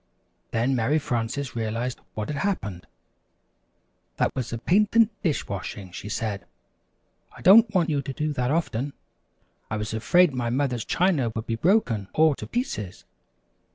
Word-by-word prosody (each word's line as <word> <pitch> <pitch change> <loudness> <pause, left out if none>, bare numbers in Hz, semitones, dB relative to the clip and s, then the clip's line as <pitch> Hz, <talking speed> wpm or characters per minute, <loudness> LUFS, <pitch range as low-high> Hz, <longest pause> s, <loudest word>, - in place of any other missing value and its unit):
Then 120 +4 +1
Mary 125 +6 +2
Frances 125 -1 -2
realized 115 +2 -2 0.2
what 105 -1 -4
had 150 - -3
happened. 105 - -3 1.3
"That - - +1
was 125 -3 -3
a 115 - -2
patent 210 - +3
dish 160 -7 -1
washing," 95 -1 -6
she 105 - -7
said. 105 -2 -3 0.9
"I - - -12
don't 220 +3 +8
want 170 -3 +3
you 145 -2 +1
to 140 0 -5
do 150 +2 -2
that 125 -2 -1
often. 145 -4 -1 0.8
I 110 - -2
was 105 +1 -4
afraid 160 +9 +4
my 120 -2 -1
mother's 125 -2 -1
china 165 -11 +1
would 110 0 -3
be 115 - -2
broken 120 - +2
all 155 -1 +5
to - - -7
pieces! 110 - -4
130 Hz, 155 wpm, -25 LUFS, 110-160 Hz, 1.3 s, don't